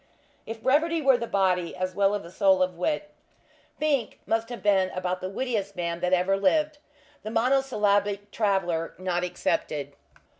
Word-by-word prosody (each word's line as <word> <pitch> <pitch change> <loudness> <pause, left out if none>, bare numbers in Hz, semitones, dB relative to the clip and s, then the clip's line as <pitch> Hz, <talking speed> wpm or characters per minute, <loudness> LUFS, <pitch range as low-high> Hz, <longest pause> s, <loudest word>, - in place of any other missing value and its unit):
If 225 0 -7
brevity 325 +5 +2
were 270 -4 +4
the 235 - -3
body, 185 -4 +1
as 185 0 -3
well 200 +1 +2
as 205 - -4
the 170 - -11
soul 190 -1 +4
of 180 -1 -2
wit, 300 - -2 0.7
Fink 285 -7 0
must 225 +1 0
have 240 - -7
been 195 -2 +3
about 185 0 -2
the 185 - -3
wittiest 205 -3 -2
man 170 -1 -3
that 180 +1 -1
ever 185 +1 +3
lived, 300 +9 +1 0.4
the 215 - -6
Monosyllabic 210 -5 +1
Traveller 190 -7 0
not 180 -1 -1
excepted. 145 -5 -2
200 Hz, 160 wpm, -26 LUFS, 185-235 Hz, 0.7 s, were